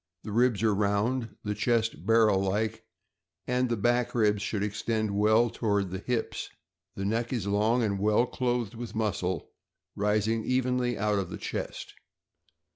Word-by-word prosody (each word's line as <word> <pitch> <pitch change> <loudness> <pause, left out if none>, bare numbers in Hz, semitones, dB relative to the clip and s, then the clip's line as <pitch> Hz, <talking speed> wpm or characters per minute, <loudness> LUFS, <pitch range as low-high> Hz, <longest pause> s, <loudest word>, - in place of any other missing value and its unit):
The 105 - -6
ribs 120 -1 +2
are 110 -2 +4
round, 105 +4 0
the 105 - -1
chest 110 -5 0
barrel 110 -3 +5
like, 110 +3 -1 0.6
and 125 0 +1
the 120 - 0
back 120 +3 +1
ribs 105 -3 +2
should 105 -1 -2
extend 110 +1 -1
well 110 +3 +4
toward 100 -4 0
the 95 - -4
hips. 120 +3 -3 0.5
The 95 - -3
neck 115 +3 -1
is 120 -7 -2
long 110 +4 +2
and 100 -3 0
well 105 +4 +3
clothed 120 -4 -1
with 115 -1 -7
muscle, 95 -6 -2 0.4
rising 105 +2 +1
evenly 125 -1 0
out 105 0 +1
of 95 -3 -3
the - - -6
chest. - - -5
110 Hz, 155 wpm, -28 LUFS, 100-120 Hz, 0.6 s, barrel